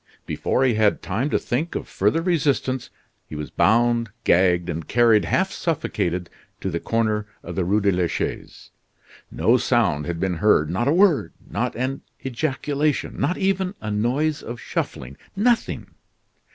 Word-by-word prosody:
Before 130 - 0
he 130 -2 +3
had 110 -1 +2
time 115 +10 -1
to - - +2
think 150 +8 -2
of - - -4
further 165 +1 +1
resistance 140 -7 0 0.4
he - - -8
was 75 0 -6
bound, 115 +1 +3
gagged, 90 -1 +3
and 85 -3 -4
carried, 115 -2 +4
half - - +1
suffocated, 90 0 -2 0.3
to 95 - -3
the 85 - -2
corner 110 -1 0 0.2
of - - -6
the 95 - 0
Rue 100 +5 +2
de 100 0 +3
la 90 -1 +1
Chaise. - - -5 0.6
No 120 +3 +3
sound 100 - +1
had 85 -1 -3
been 90 -2 -1
heard; 80 -6 +3
not 95 +8 0
a - - +4
word, 180 -3 +3
not - - -2
an 130 +3 -2 0.2
ejaculation, 145 +2 -1
not 175 +7 +1
even 190 0 0
a 105 - -4
noise 135 +9 0
of 120 +1 -7
shuffling 65 +2 -4 0.2
nothing. 230 +3 0
115 Hz, 160 wpm, -23 LUFS, 95-140 Hz, 0.6 s, carried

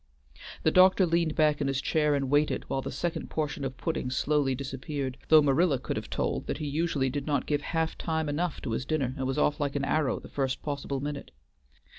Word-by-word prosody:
The 160 - +4
doctor 185 +1 +6
leaned 170 -2 +1
back 150 -1 +3
in 140 - +1
his 135 -1 0
chair 150 0 +2
and 135 -1 -1
waited 145 +1 +2
while 135 - -1
the - - -5
second 170 +6 -3
portion 150 -2 -2
of 135 -1 -4
pudding 160 -6 -2
slowly 135 +1 +1
disappeared, 135 0 -4
though 155 -1 +7
Marilla 145 +1 +3
could - - -4
have - - -5
told - - -2
that - - -2
he 155 - -4
usually 145 -3 0
did 140 +1 -4
not 145 -3 0
give 145 -1 0
half 160 +1 -1
time 160 -2 -1
enough 155 +3 -2
to 120 - -3
his 115 - -1
dinner 135 -3 -1
and 130 -2 -2
was 135 - -2
off 150 0 +2
like 145 -1 -1
an 140 -1 0
arrow 150 -2 +1
the - - -11
first 135 -2 -2
possible 140 -2 -3
minute. 145 0 -5
145 Hz, 220 wpm, -28 LUFS, 135-155 Hz, -, though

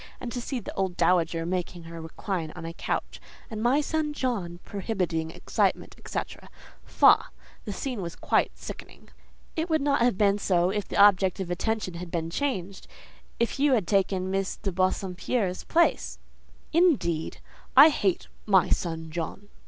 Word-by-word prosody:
And 240 - -6
to 245 - -4
see 255 +1 -3
the 220 - -8
old 190 -2 -2
dowager 165 -1 +2
making 175 -1 -3
her 165 0 -8
recline 165 0 -4
on 170 -2 -7
a 165 - -5
couch, - - -4 0.3
and 215 -1 -4
'my 255 +6 +3
son 305 0 -1
John' 200 -12 -2
prohibiting 185 -6 -2
excitement, - - -1
etcetera—faugh! - - 0 0.3
the 210 - -4
scene 245 +1 -4
was 170 -2 -5
quite - - +1
sickening." - - -10 0.5
"It 320 +2 -2
would 315 -1 +3
not 280 -3 +2
have 240 -5 +3
been 200 0 +3
so 180 -2 +2
if 210 0 -2
the - - -4
object 195 -2 +5
of 180 -2 -3
attention 210 +1 -2
had 170 +1 -7
been 165 -1 -3
changed: 195 -6 -3 0.5
if 235 +3 0
you 285 -1 +4
had 220 -7 +2
taken 190 -1 +1
Miss 195 0 -1
de 195 - -3
Bassompierre's 185 +2 -1
place." 340 +1 +2 0.6
"Indeed! 265 - +2 0.4
I 290 +4 +11
hate 195 - 0 0.2
'my 190 -3 +4
son 160 -2 -2
John! 175 +5 -5
190 Hz, 160 wpm, -27 LUFS, 175-235 Hz, 0.6 s, I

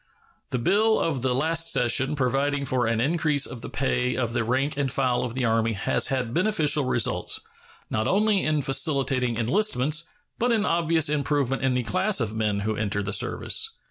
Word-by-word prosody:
The - - -2
bill 210 - +2
of 150 -6 -1
the 130 -1 0
last 165 +4 +1
session 130 +4 +2
providing 140 +1 0
for 130 -3 0
an 115 0 0
increase 150 +1 +1
of 120 - -7
the - - -7
pay 125 -1 -1
of 120 -3 -2
the 120 -1 0
rank 135 +6 -1
and 140 -2 -1
file 130 -2 +1
of 120 -1 -4
the 130 -1 -1
Army 115 0 +1
has 100 - 0
had 125 -3 -2
beneficial 160 -6 +2
results, 120 -2 0 0.5
not 110 +2 -1
only 205 +3 +2
in 155 -2 0
facilitating 135 -4 0
enlistments, 155 - +1 0.3
but 245 +1 +1
in 220 -2 +1
obvious 165 -2 +1
improvement 145 -3 0
in 130 -1 +1
the 125 - 0
class 185 - 0
of 110 -4 -1
men 105 -2 -1
who 110 +1 -2
enter 105 -1 -2
the 100 +1 -3
service. - - 0
135 Hz, 185 wpm, -25 LUFS, 120-155 Hz, 0.5 s, bill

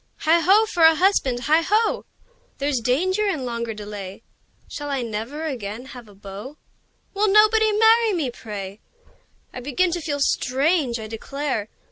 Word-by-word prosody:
Heigh 325 +2 +4
ho! 390 +7 +4
for 365 -6 -3
a 320 0 +7
husband! 305 -9 +1
Heigh 310 +6 +3
ho! 430 +6 +1 0.5
There's 280 -2 -1
danger 370 - 0
in 310 -10 -2
longer 235 -1 -3
delay! 205 -1 -8 0.4
Shall 290 -1 -6
I 275 -3 -1
never 230 +7 -5
again 235 -5 -5
have 245 -3 -11
a 205 - -17
beau? 205 +8 -10 0.6
Will 415 +1 +1
nobody 430 +1 +5
marry 445 +1 +4
me, 300 -8 -1
pray! 205 -3 -8 0.7
I - - -6
begin 290 +8 0
to 345 0 -3
feel 290 -2 -3
strange, 275 0 +1
I 220 - -6
declare! 225 0 -4
280 Hz, 155 wpm, -22 LUFS, 230-365 Hz, 0.7 s, a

